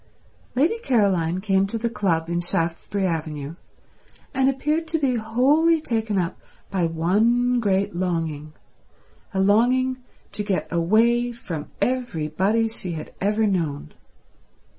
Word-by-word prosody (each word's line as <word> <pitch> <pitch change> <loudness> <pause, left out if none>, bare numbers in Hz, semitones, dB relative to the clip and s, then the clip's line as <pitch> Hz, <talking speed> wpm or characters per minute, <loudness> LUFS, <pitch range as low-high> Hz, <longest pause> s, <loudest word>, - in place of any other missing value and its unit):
Lady 325 - +2
Caroline 190 - +1
came 195 -1 +2
to 230 - -3
the 230 +1 -1
club 170 -8 0
in 170 0 -1
Shaftesbury 175 +3 -1
Avenue, 155 -4 -3 0.8
and 265 0 +3
appeared 300 +4 -1
to 325 - +1
be 265 -5 +1
wholly 275 +9 +3
taken 225 -7 -1
up 180 -1 -1 0.3
by 180 -3 +1
one 225 +10 +2
great 200 -2 +1
longing, 165 -4 -2 0.8
a 195 - -2
longing 245 +6 +3 0.3
to - - -3
get 200 -2 -1
away 230 +8 +3
from 170 -10 -6
everybody 220 -3 0
she 190 -5 -5
had 155 - -7
ever 210 +3 +2
known. 160 - -2
205 Hz, 125 wpm, -23 LUFS, 170-240 Hz, 0.8 s, and